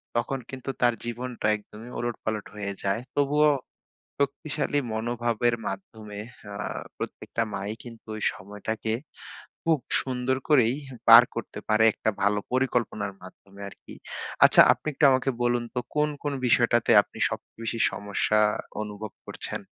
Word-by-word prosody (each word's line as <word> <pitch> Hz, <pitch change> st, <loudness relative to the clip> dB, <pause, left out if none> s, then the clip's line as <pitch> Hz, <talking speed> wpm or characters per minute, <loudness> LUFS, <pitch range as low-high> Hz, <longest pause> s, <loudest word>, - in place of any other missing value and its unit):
তখন 120 Hz, +3 st, 0 dB
কিন্তু 130 Hz, 0 st, -7 dB
তার 120 Hz, 0 st, +5 dB
জীবনটা 120 Hz, -1 st, -3 dB
একদমই 105 Hz, +3 st, -12 dB
ওলটপালট 110 Hz, -3 st, -3 dB
হয়ে 100 Hz, -1 st, -3 dB
যায়। 100 Hz, +3 st, 0 dB
তবুও 150 Hz, +1 st, +4 dB, 0.7 s
শক্তিশালী 145 Hz, +1 st, 0 dB
মনোভাবের 120 Hz, +1 st, 0 dB
মাধ্যমে 105 Hz, +2 st, -7 dB, 0.3 s
আ -, -, -6 dB, 0.4 s
প্রত্যেকটা -, -, -4 dB
মা-ই 100 Hz, +2 st, -3 dB
কিন্তু 115 Hz, -2 st, -12 dB
ঐ -, -, -6 dB
সময়টাকে 105 Hz, +3 st, -4 dB, 0.7 s
খুব 160 Hz, -2 st, +3 dB, 0.2 s
সুন্দর 130 Hz, 0 st, -1 dB
করেই 125 Hz, -5 st, +5 dB, 0.3 s
পার 115 Hz, +1 st, +11 dB
করতে 115 Hz, -, -5 dB
পারে 110 Hz, +1 st, +4 dB
একটা -, -, -1 dB
ভালো 100 Hz, +1 st, +3 dB
পরিকল্পনার 120 Hz, -5 st, 0 dB
মাধ্যমে 100 Hz, +2 st, -14 dB
আরকি। -, -, -14 dB, 0.5 s
আচ্ছা -, -, +8 dB
আপনি -, -, -12 dB
একটু 145 Hz, -, +3 dB
আমাকে 130 Hz, +1 st, +2 dB
বলুন 120 Hz, 0 st, +2 dB
তো 125 Hz, -, 0 dB, 0.2 s
কোন 150 Hz, 0 st, +3 dB
কোন 145 Hz, -1 st, -1 dB
বিষয়টাতে 120 Hz, -1 st, +3 dB
আপনি -, -, -16 dB
সবচেয়ে -, -, -8 dB
বেশি 115 Hz, 0 st, -2 dB
সমস্যা 100 Hz, +1 st, 0 dB, 0.4 s
অনুভব 105 Hz, 0 st, -6 dB
করছেন? -, -, -5 dB
115 Hz, 135 wpm, -26 LUFS, 105-130 Hz, 0.7 s, পার